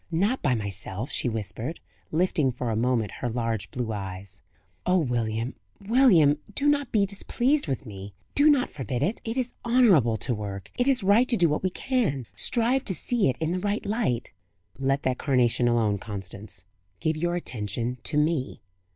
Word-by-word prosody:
"Not 200 +10 +1
by 130 -4 +2
myself," 100 +2 -2
she 125 - +2
whispered, 110 - -4 0.3
lifting 155 -4 +2
for 125 -1 -3
a - - -1
moment 115 -2 +1
her 120 - -1
large 115 -2 -2
blue 120 -3 -3
eyes. 95 -2 -5 0.4
"Oh, 180 +1 +3
William, 120 -5 -1 0.3
William, 195 - +4 0.2
do 285 - +1
not 285 -3 +2
be 205 -3 +3
displeased 240 - +1
with 135 -1 -3
me! 100 -2 -9 0.2
do 290 +2 +5
not 280 -4 +3
forbid 130 -2 -3
it! 195 +9 -1
It 225 +2 -4
is 250 -1 -1
honourable 200 - +4
to 125 - -1
work 100 -3 -6
it 245 - 0
is 260 -6 +3
right 210 +6 +4
to 235 - +2
do 175 -3 +4
what 150 -1 0
we 185 - +1
can. 190 - -1
Strive 245 +3 +2
to 190 - +1
see 230 - +1
it 130 - -2
in 160 +1 -1
the 185 - -1
right 205 +3 -2
light." 200 - -1 0.5
"Let 135 +1 0
that 130 -1 0
carnation 125 -3 +2
alone, 110 -4 +2
Constance; 100 -2 -7 0.3
give 160 0 0
your 175 +2 -1
attention 120 -4 -3
to 150 - 0
me. 150 -3 0
135 Hz, 180 wpm, -26 LUFS, -, 0.5 s, do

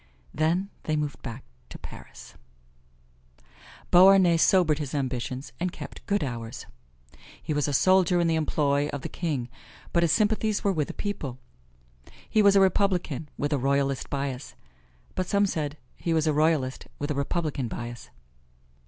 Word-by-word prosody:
Then 170 +6 0
they 155 - 0
moved 150 -2 -3
back 120 0 -7 0.3
to - - -9
Paris. - - -12 1.6
Beauharnais 185 -1 +7
sobered 165 -3 +4
his 150 -1 -4
ambitions, 130 0 -3
and 180 +1 -1
kept - - -9
good 205 -5 +1
hours. 115 -3 -5 0.7
He 155 - -3
was 145 0 0
a - - 0
soldier 185 +4 +4
in 170 - +2
the 165 - +2
employ 145 -2 +1
of 145 -2 -5
the - - -4
king, 145 -9 -2 0.5
but 170 - +3
his 170 -2 +3
sympathies 215 +1 +1
were 200 - +2
with 150 -4 -1
the - - -7
people. 155 - -4 0.9
He 215 - +3
was 200 -1 +6
a - - +7
Republican 180 -6 +1
with 145 +1 -1
a 145 - +1
Royalist 140 0 0
bias, 140 -2 -4 0.6
but 185 -1 -2
some 200 0 +3
said 150 -5 -3 0.2
he 165 -1 -1
was 160 -1 +2
a 155 - +2
Royalist 150 -4 +1
with 145 +1 -3
a - - +1
Republican 140 -2 -2
bias. 120 +1 -7
155 Hz, 160 wpm, -26 LUFS, 140-180 Hz, 1.6 s, Beauharnais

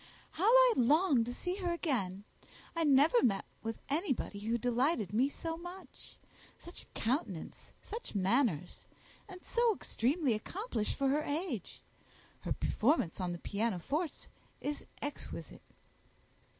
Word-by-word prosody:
"How 330 +5 -1
I - - +7
long 280 +1 +4
to 245 - -4
see 360 +9 -3
her 360 -3 -1
again! 230 - -1 0.5
I 335 - +1
never 295 - +5
met 200 -5 +2 0.2
with 225 0 -3
anybody 280 - -1
who 225 +3 0
delighted 245 - +1
me 255 +6 +3
so 325 +2 -4
much. 355 +2 -10 0.4
Such 345 - -8
a - - -18
countenance, 225 - -2
such 450 - -6
manners, 190 - +1 0.4
and 365 -2 -11
so 470 -2 +3
extremely 270 0 +1
accomplished 225 - -3
for 275 -1 +1
her 295 +3 +2
age! 295 - -3 0.6
Her - - -5
performance 220 - +1
on 180 -1 -1
the 175 - -3
pianoforte 230 - -2 0.3
is 290 0 -4 0.2
exquisite." 290 0 -6
275 Hz, 130 wpm, -33 LUFS, 225-345 Hz, 0.6 s, I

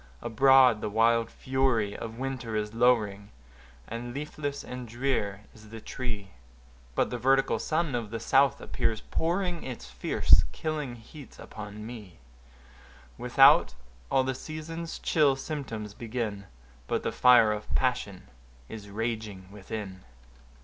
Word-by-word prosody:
Abroad 125 -1 +5
the 105 - -2
wild 115 +2 +3
fury 130 -6 0
of 115 0 -7
winter 130 -4 -4
is 105 0 -2
lowering, 110 -4 +2 0.6
And 120 +2 -6
leafless 145 -1 -4
and 125 -1 -7
drear 115 -5 -2
is 110 -1 -15
the 115 +1 -8
tree; 105 -5 -5 0.6
But - - +1
the 125 - -3
vertical 135 +3 +3
sun 160 -2 -1
of 120 -3 -2
the 115 +1 -4
south 135 +4 +3
appears 110 -2 -1
pouring 175 +1 -1
Its 125 - -7
fierce, 60 -1 +4
killing 150 -6 -3
heats 130 +5 -13
upon 105 0 -9
me: 110 -7 -9 1.0
Without, - - +5 0.3
all 130 - +3
the 130 0 -1
season's 160 +4 -6
chill 150 -4 +3
symptoms 130 -8 -5
begin— 110 -4 -4 0.4
But - - -1
the - - -1
fire 120 -3 +6
of 105 0 -5
passion - - -1 0.5
is 105 -2 -9
raging 105 -3 -4
within. 100 -2 -7
115 Hz, 130 wpm, -28 LUFS, 105-135 Hz, 1.0 s, fire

